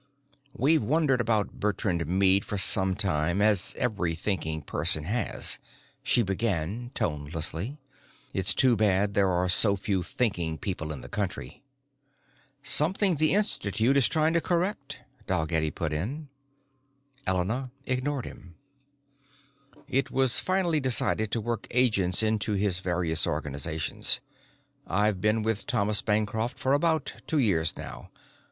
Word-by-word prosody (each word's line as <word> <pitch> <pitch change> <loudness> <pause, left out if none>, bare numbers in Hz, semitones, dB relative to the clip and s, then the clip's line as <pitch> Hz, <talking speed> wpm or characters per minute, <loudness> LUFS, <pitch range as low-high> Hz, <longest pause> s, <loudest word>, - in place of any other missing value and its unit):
"We've 155 +6 +3
wondered 135 +1 +2
about 110 -3 -1
Bertrand 95 -5 -1
Meade 95 +2 +3
for 105 - -4
some 95 -1 +5
time, 85 -3 0
as 105 -2 +2
every 100 -9 -1
thinking 80 -4 -2
person 75 +2 +1
has," 105 +5 -1 0.4
she 120 - +2
began 100 +2 -2
tonelessly. 80 - -2 0.6
"It's 95 +1 +1
too 130 -3 +5
bad 100 -1 +2
there 100 -1 +3
are 90 0 +1
so 100 +2 +2
few 95 -1 -1
thinking 90 -5 -2
people 80 -5 -4
in 70 -4 -7
the 60 - -10
country." 90 -7 -4 1.0
"Something 180 +4 +3
the 155 +5 +3
Institute 130 - +1
is 140 -3 +4
trying 160 0 +2
to 170 - +2
correct," 170 -7 -2 0.3
Dalgetty 80 -3 0
put 80 -1 -4
in. 135 - -4 1.0
Elena 105 +8 -1 0.2
ignored 130 +1 -2
him. 85 -2 -12 1.3
"It 135 0 0
was 130 -2 +2
finally 185 -4 +1
decided 120 -4 +2
to 115 - 0
work 115 0 -3
agents 110 -6 +2
into 110 0 0
his 100 -2 +1
various 85 -3 -1
organizations. 75 +3 -1 0.7
I've 100 0 +1
been 105 +2 +1
with 110 -1 -2
Thomas 105 -4 +1
Bancroft 110 +3 -1
for 130 - 0
about 160 +2 +1
two 160 - 0
years 85 - +1
now. - - -9
105 Hz, 130 wpm, -27 LUFS, 90-125 Hz, 1.3 s, some